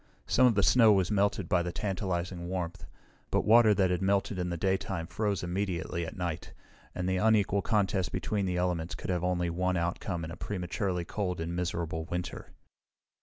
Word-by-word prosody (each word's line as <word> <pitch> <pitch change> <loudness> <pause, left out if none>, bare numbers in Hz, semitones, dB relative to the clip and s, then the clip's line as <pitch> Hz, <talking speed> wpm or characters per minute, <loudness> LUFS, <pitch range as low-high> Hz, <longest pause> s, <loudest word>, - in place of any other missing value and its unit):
Some 130 0 +4
of 115 - +2
the 100 - +3
snow 115 -1 +6
was 95 -3 +2
melted 100 -3 +1
by 90 +1 +2
the 90 0 -3
tantalizing 90 -3 -3
warmth, 90 -3 -4 0.4
but - - +1
water 110 0 +7
that 95 -2 +2
had 90 - 0
melted 95 0 +1
in 90 0 -1
the 85 - -3
daytime 95 -1 -1
froze 100 +1 -2
immediately 85 -2 -2
at 105 - -8
night, 90 -1 -4 0.4
and 90 0 -2
the 95 0 +1
unequal 105 -1 +3
contest 100 -3 0
between 100 -3 -1
the 90 -1 -1
elements 90 -2 -1
could - - -4
have 90 -1 -1
only 90 -1 0
one 90 +1 0
outcome 85 0 -2
in 80 - -7
a - - -6
prematurely 90 -2 -3
cold 90 -2 -3
and 85 +1 -3
miserable 85 -2 -2
winter. 90 +1 -5
90 Hz, 185 wpm, -30 LUFS, 85-100 Hz, 0.4 s, water